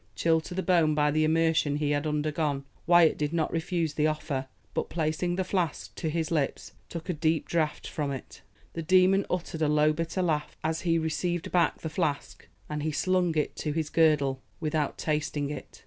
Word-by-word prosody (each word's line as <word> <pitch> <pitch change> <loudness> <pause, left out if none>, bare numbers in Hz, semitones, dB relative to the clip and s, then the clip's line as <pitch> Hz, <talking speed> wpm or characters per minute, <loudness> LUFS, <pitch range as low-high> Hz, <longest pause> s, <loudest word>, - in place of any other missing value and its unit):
Chilled 160 -1 +2
to 180 - -7
the 190 - -1
bone 165 -5 +3
by 150 0 +3
the 155 +1 +2
immersion 160 -2 +2
he 150 0 0
had 145 +1 0
undergone, 150 -1 -1 0.2
Wyat 175 -2 +5
did 150 +1 -1
not 165 -2 0
refuse 165 -2 -1
the 150 +1 +2
offer, 150 -3 -2 0.3
but - - -2
placing 165 +2 -1
the 190 - 0
flask 180 -5 -2
to 160 - -3
his 160 0 -2
lips 150 -5 -1 0.2
took 165 -1 -6
a 180 - 0
deep 160 0 0
draught 155 -3 -1
from 150 -2 -3
it. 135 -2 -7 0.3
The 165 - -4
demon 185 +3 +4
uttered 170 -2 -3
a 155 - +3
low 150 +1 +3
bitter 165 +4 -2
laugh 150 -4 -1
as 160 +1 -1
he 165 -2 +2
received 165 +2 -2
back 175 -2 +2
the - - -3
flask, 155 -3 -3 0.2
and 150 0 -3
he 155 +1 -1
slung 175 +1 +1
it 150 - 0
to 150 - -2
his 155 -1 -2
girdle 145 -5 +3 0.2
without 155 -2 -1
tasting 150 -2 -1
it. 150 - -8
155 Hz, 195 wpm, -28 LUFS, 150-170 Hz, 0.3 s, Wyat